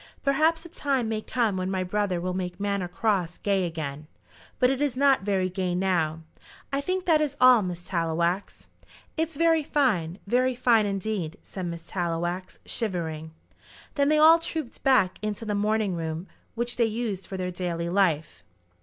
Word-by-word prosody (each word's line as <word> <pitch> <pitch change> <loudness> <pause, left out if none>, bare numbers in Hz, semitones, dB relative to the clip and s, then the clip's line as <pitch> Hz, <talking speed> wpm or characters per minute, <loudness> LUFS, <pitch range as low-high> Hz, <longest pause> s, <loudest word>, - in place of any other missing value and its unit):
Perhaps 315 +4 +2
a - - -9
time 275 -7 -1
may 220 -1 -1
come 225 -4 0
when 185 0 -2
my 190 -1 -1
brother 190 -1 -1
will 180 +1 -2
make 180 0 -4
Manor 200 -2 -1
Cross 180 -3 -1
gay 195 -3 +1
again, 155 -2 -5 0.5
but 250 0 +4
it 270 +1 -2
is 280 -4 0
not 275 -3 +4
very 195 -2 0
gay 185 -1 -2
now. 170 -4 0 0.5
I 275 - +1
think 370 +4 -2
that 320 -3 +4
is 285 -2 -1
all, 255 -2 +7
Miss 180 -2 -5
Tallowax." 170 +2 -1 0.5
"It's 320 -1 -1
very 330 0 +4
fine; 215 - 0
very 250 +4 +2
fine 230 -4 +3
indeed," 195 -4 -3
said 185 -2 -6
Miss 170 -1 -6
Tallowax, 175 +1 -3
shivering. 165 -8 -3 0.6
Then 280 -1 +2
they 305 - +4
all 320 +2 +7
trooped 320 -6 -5
back 225 -9 +3
into 215 +1 -3
the 210 - -1
morning 210 -1 +1
room 165 +1 -4 0.3
which 240 +1 -2
they 235 - +4
used 220 -4 -3
for 190 - -5
their 180 0 -2
daily 175 -2 -3
life. 170 -4 0
200 Hz, 170 wpm, -26 LUFS, 175-255 Hz, 0.6 s, all